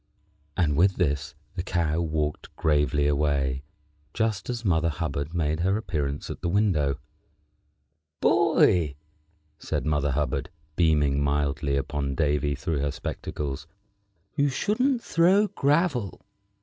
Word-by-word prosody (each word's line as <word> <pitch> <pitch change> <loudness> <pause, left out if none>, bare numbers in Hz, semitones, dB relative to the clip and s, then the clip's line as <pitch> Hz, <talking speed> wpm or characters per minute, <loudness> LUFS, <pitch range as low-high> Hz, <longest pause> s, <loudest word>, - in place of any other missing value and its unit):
And 80 -6 +2
with 95 +4 +4
this 70 -4 -1 0.2
the 90 - -3
Cow 85 -3 0
walked 75 -2 -2
gravely 75 -2 +2
away, 70 -2 +1 0.5
just 110 -3 -1
as 120 -1 -3
Mother 85 -3 +2
Hubbard 75 -1 -3
made 80 -1 0
her 95 +4 +2
appearance 75 -9 -3
at - - -8
the 85 - -1
window. 85 -9 +2 1.2
"Boy," 80 -6 +3 0.6
said - - -3
Mother 75 -2 +1
Hubbard, 70 +2 -1 0.3
beaming 75 -4 +3
mildly 70 0 0
upon 70 0 -2
Davy 75 -1 +1
through 80 +1 -2
her 70 +1 0
spectacles, 75 0 -5 0.7
"you 145 -1 +2
shouldn't 235 - +1
throw 185 +5 +4
gravel." 145 - +1
75 Hz, 120 wpm, -26 LUFS, 70-95 Hz, 1.2 s, with